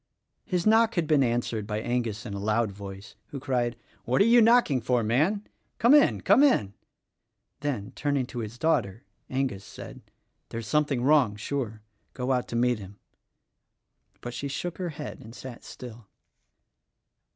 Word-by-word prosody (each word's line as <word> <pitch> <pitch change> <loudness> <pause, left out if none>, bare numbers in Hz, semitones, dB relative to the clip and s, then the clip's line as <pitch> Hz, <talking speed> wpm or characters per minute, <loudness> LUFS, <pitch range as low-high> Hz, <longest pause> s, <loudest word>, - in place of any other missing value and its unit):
His 180 -2 -1
knock 225 +1 +4
had 170 -3 +1
been 150 -2 +3
answered 120 -4 -1
by 105 -1 -2
Angus 120 -2 -2
in 105 - -5
a 100 - -4
loud 105 +1 +1
voice, 100 +1 -10
who 140 - -7
cried, 125 -3 -1 0.3
"What 125 +3 +1
are 200 - +6
you 235 +1 +6
knocking 225 - +4
for, 120 0 +1
man? 155 - +1 0.3
Come 235 +4 +5
in. 295 -1 +5
Come - - +5
in!" 120 - +3 0.9
Then, 135 -9 -3
turning 140 -3 -1
to 125 -1 -7
his 110 +1 -6
daughter, 120 -8 0 0.3
Angus 130 -7 -2
said, - - -10 0.5
"There's 115 0 -5
something 145 -1 +1
wrong, 135 -7 +4
sure. 110 -1 -4 0.3
Go 125 +1 -2
out 125 -1 0
to - - -5
meet 120 -1 +2
him." 100 0 -11 1.2
But 120 - -6
she 140 - -4
shook 170 +6 -4
her 180 -2 -2
head 150 -1 -7
and 115 +2 -12
sat 130 -3 -9
still. 120 -3 -10
125 Hz, 165 wpm, -27 LUFS, 110-150 Hz, 1.2 s, are